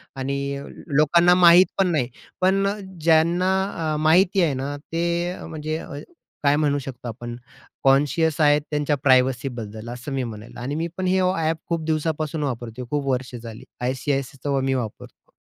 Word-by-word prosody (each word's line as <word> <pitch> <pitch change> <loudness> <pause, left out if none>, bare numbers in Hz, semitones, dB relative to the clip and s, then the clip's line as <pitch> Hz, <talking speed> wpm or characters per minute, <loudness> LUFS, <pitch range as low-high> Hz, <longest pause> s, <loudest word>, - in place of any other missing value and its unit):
आणि 135 +1 -2 0.6
लोकांना 170 +4 +5
माहीत 175 +1 +8
पण 195 -1 +3
नाही. 145 -7 +1 0.3
पण 195 +2 +3
अ, 200 +1 -1 0.2
ज्यांना 170 +3 +3 0.4
अ, - - -1
माहिती 180 +5 +4
आहे 160 -5 +2
ना, 135 +2 -3
ते 170 +3 -2
म्हणजे 155 0 -4
अ, - - -9 0.5
काय 140 0 +4
म्हणू 145 -1 +1
शकतो 130 -2 -8
आपण, 120 +1 -6 0.5
कॉन्शियस 145 +4 +3
आहेत, 145 0 +5
त्यांच्या 150 0 +1
प्रायव्हसीबद्दल 125 -4 +1
असं 125 +3 -7
मी 135 -1 -1
म्हणेल. 110 -1 -8
आणि 130 +4 -4
मी 165 +2 -1
पण 185 -1 -1
हे 190 +1 +3
ओ 185 0 +2
ॲप 160 0 0
खूप 165 -2 -1
दिवसापासून 155 -1 -1
वापरतोय. 120 -2 -4
खूप 145 0 -2
वर्षे 125 -1 -2
झाली 115 -1 -9 0.2
आय-सी-आय-सीचं 135 +2 -2
व 135 - +2
मी 135 0 0
वापरतो. 120 -5 -6
145 Hz, 165 wpm, -23 LUFS, 130-165 Hz, 0.6 s, माहीत